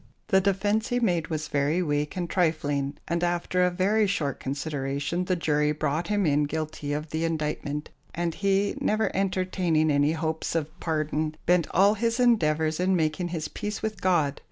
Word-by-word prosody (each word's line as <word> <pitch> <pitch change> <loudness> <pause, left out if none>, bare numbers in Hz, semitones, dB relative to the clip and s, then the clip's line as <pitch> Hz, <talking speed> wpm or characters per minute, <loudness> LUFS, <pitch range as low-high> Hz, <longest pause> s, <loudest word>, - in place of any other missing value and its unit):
The 190 - +5
defence 205 +3 +1
he 245 - 0
made 175 -8 +1
was 155 -1 -3
very 145 +5 +1
weak 150 +2 -1
and 175 -1 -1
trifling, 145 -5 0
and 170 +1 -1
after 175 +1 0
a 180 - +4
very 200 +4 +2
short 150 -9 -1
consideration 140 +4 -2
the 185 - +1
jury 150 -3 +1
brought 155 +3 -1
him 205 -1 +1
in 145 -1 +3
guilty 155 -1 -4
of 150 +2 -3
the 160 +1 -1
indictment, 150 -2 -2 0.2
and 170 -1 -1
he, 195 +2 +1
never 215 +1 +1
entertaining 185 -5 +1
any 145 +2 +3
hopes 160 0 -2
of 160 +1 -3
pardon, 155 -1 -1
bent 175 -2 +3
all 200 +3 +4
his 230 +3 -1
endeavours 160 -10 +2
in 185 +1 +2
making 160 +1 0
his 165 -3 -3
peace 210 +6 -5
with 215 -3 -3
God. 160 -7 +2
165 Hz, 175 wpm, -26 LUFS, 150-185 Hz, 0.2 s, The